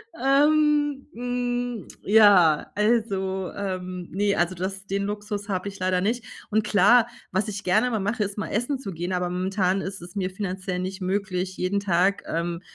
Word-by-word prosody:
Ähm, 290 +1 +3
hm, 245 -1 -3 0.2
ja, 195 -7 +5
also, 195 -4 0
ähm, 185 -2 -4
ne, 200 +1 +1
also 175 +1 0
das 195 +2 -5
den 200 +1 -1
Luxus 205 0 -4
habe 185 0 -2
ich 200 0 -7
leider 185 0 +1
nicht. 230 +5 0 0.3
Und 215 0 +2
klar, 215 +4 +5 0.2
was 190 +5 0
ich 205 -1 -5
gerne 215 +7 +2
mal 220 - 0
mache, 210 +3 -1
ist 200 +1 -5
mal 215 - -3
essen 245 +5 -1
zu 195 -8 -6
gehen, 175 +3 -3
aber 180 -1 -1
momentan 185 +1 0
ist 190 0 -6
es 175 +3 -11
mir 185 -2 -1
finanziell 185 -1 -4
nicht 190 +2 -4
möglich, 185 -1 -2
jeden 185 +2 0
Tag, 195 0 +1
ähm, 170 +1 -2
200 Hz, 175 wpm, -25 LUFS, 185-220 Hz, 0.3 s, ja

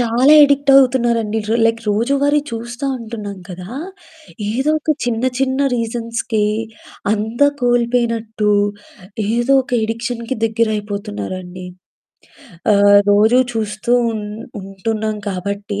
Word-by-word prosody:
చాలా 245 +5 +4
యడిక్ట్ 280 -1 +4
అవుతున్నారండి. 235 -5 +3
ర - - +1
లైక్ 230 0 0
రోజువారీ 280 +7 +2
చూస్తా 235 +3 -6
ఉంటున్నాం 215 -4 -7
కదా! 180 0 -8 0.8
ఏదో 265 +6 0
ఒక 310 0 0
చిన్న 235 -1 -1 0.2
చిన్న 265 0 0 0.2
రీజన్స్‌కే 230 -2 -2 0.7
అంతా 220 +6 +1
కోల్పోయినట్టు, 235 -3 +1 0.8
ఏదోక 260 +3 +2
యడిక్షన్‌కి 235 +2 -3
దగ్గరైపోతున్నారండి. 200 - -3 1.1
ఆహ్, 200 0 +6
రోజూ 220 +5 +5
చూస్తూ 215 +1 -2 0.2
ఉన్ 215 -1 -5 0.4
ఉంటున్నాం 215 +3 -3
కాబట్టి, 200 +2 -4
225 Hz, 95 wpm, -18 LUFS, 210-245 Hz, 1.1 s, ఆహ్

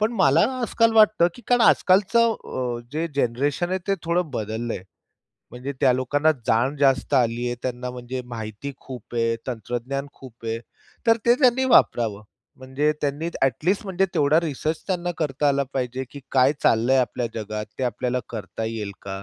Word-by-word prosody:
पण 220 +3 +1
मला 140 -2 +5 0.2
आजकाल 230 -1 +2
वाटतं 215 -5 +5
की 245 - -14
कारण 245 -1 +4
आजकालचं 225 +4 +4
अ, 125 -2 -3
जे 160 +3 -1
जनरेशन 140 +6 0
आहे 185 - 0
ते 195 - +2
थोडं 170 -1 0
बदललंय. 110 -3 -4 0.7
म्हणजे 125 +3 -6
त्या 135 -3 +5
लोकांना 145 +5 +2 0.2
जाण 125 +6 +2
जास्त 135 0 +2
आली 120 -2 +2
आहे, 120 - -1
त्यांना 125 0 -3
म्हणजे 125 +1 -6
माहिती 115 +3 -6
खूप 125 -4 -10
आहे, 115 -1 +1
तंत्रज्ञान 125 +3 -4
खूप 120 -3 -14
आहे 115 0 -2 0.5
तर 230 0 +6
ते 240 - +7
त्यांनी 255 -1 +4
वापरावं. 115 - +3 0.3
म्हणजे 130 +3 -1
त्यांनी 145 +3 -2
ॲटलीस्ट 165 - +1
म्हणजे 190 -1 0
तेवढा 150 +3 +4
रिसर्च 155 0 -3
त्यांना 175 -2 -1
करता 145 -2 0
आला 140 0 +2
पाहिजे, 130 0 -2
की 140 - -9
काय 130 +1 +5
चाललंय 120 +4 +3
आपल्या 125 -1 0
जगात 105 -1 -4
ते 130 - 0
आपल्याला 125 +1 -1
करता 110 0 -5
येईल 110 -2 -4
का? 95 0 -6
130 Hz, 165 wpm, -23 LUFS, 120-165 Hz, 0.7 s, ते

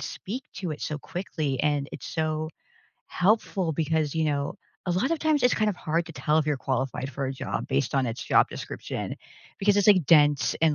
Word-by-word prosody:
speak 245 +8 -5
to 185 -4 -4
it 150 - -8
so 150 -1 -3
quickly, 155 -7 -3
and 145 -2 +1
it's, - - -7
so, 155 -1 -1 0.6
helpful 190 -3 +1
because, 155 -1 0
you 160 -1 +1
know, 140 -2 -1 0.3
a - - 0
lot 190 - +1
of 330 - 0
times 310 -3 +2
it's 250 - +4
kind 215 -1 +2
of 180 - -6
hard 165 +2 -1
to 165 - -9
tell 155 0 +1
if 155 - 0
you're 150 -2 +1
qualified 130 0 -2
for 135 +1 -2
a 135 - -2
job 130 - -4
based 135 0 0
on 135 -2 +2
its 115 0 -4
job - - +4
description. - - -5 0.4
Because 205 0 +3
it's, 205 - +3
like, 185 -6 +6
dense 145 -3 +5
and, 160 -2 +4
155 Hz, 210 wpm, -27 LUFS, 145-185 Hz, 0.6 s, like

